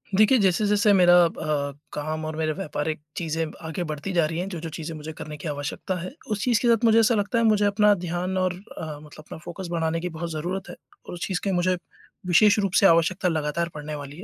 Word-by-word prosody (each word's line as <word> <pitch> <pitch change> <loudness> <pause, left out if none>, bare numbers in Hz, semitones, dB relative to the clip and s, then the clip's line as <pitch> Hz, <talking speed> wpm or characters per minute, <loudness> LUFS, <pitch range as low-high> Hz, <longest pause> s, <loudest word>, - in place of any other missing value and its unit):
देखिए 215 +6 +5
जैसे-जैसे 205 +2 +3
मेरा 175 -2 +6
अ, 150 -3 -2 0.2
काम 155 +1 -3
और 155 0 -4
मेरे 155 -1 0
व्यापारिक 155 -3 -3 0.2
चीज़ें 160 -1 -2
ब - - -15
आगे 160 +2 -4
बढ़ती 155 +4 -5
जा 170 -3 +3
रही 160 +2 -3
हैं, 185 - -2
जो-जो 170 -3 -5
चीज़ें 160 +1 -6
मुझे 155 +1 -7
करने 150 0 -8
की 150 - -7
आवश्यकता 145 +5 -4
है 185 - -6 0.2
उस 210 -1 -1
चीज़ 235 -3 +3
के 245 - +1
साथ 235 0 +3
मुझे 225 0 +6
ऐसा 225 +1 +4
लगता 205 +3 0
है - - +2
मुझे 210 -2 +4
अपना 205 +1 +4
ध्यान 180 +2 -2
और 185 -1 +1
मतलब 155 -4 -9
अपना - - -8
फ़ोकस 175 +3 -8
बढ़ाने 165 -1 0
की 180 +2 -3
बहुत 170 +1 -5
ज़रूरत 180 +5 -4
है - - -8 0.3
और - - -7
उस 175 - -4
चीज़ 190 -2 -1
की 200 - 0
मुझे 180 0 +1 0.5
विशेष 205 +5 +5
रूप 195 -2 0
से - - +5
आवश्यकता 170 +1 +4
लगातार 160 +1 -1
पढ़ने 150 0 -6
वाली 145 0 -8
है। 180 - -9
170 Hz, 230 wpm, -25 LUFS, 155-195 Hz, 0.5 s, मेरा